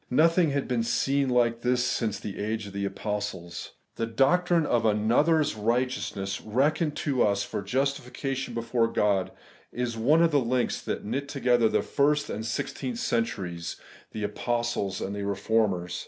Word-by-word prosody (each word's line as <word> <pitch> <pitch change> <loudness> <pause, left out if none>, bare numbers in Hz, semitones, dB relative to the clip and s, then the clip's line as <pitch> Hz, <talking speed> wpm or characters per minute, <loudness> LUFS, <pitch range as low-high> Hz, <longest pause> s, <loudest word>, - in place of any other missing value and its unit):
Nothing 165 +5 +4
had 140 -1 -1
been 125 -2 0
seen 135 +4 +1
like 120 -2 +2
tliis 125 +1 +2
since 125 -4 0
the 100 - -6
age 110 +1 -2
of 100 -1 -10
apostles. 100 -3 -4 0.2
The 115 - -1
doctrine 170 +8 +3
of 120 - +1
another's 120 +9 +3
righteousness 110 -3 -1
reckoned 145 +7 +1
to 135 -5 +1
us 100 -1 +2
for - - -4
justification 135 +3 -2
before 115 0 +1
God 100 -4 +1 0.4
is 120 -1 -3
one 150 +9 +4
of 165 - +3
the 145 - +4
links 125 -1 0
that - - -4
knit 135 +6 -3
together 125 -5 +3
the - - +1
first 145 +1 +1
and 105 - -3
the 110 - -4
sixteenth 120 +2 -3
cen 115 -1 +1
turies, 90 -8 -5 0.4
the 110 - -5
Apostles 110 -2 -1
and 100 - -3
the 100 - -4
Eeformers. 100 -2 0
115 Hz, 160 wpm, -27 LUFS, 105-135 Hz, 0.4 s, Nothing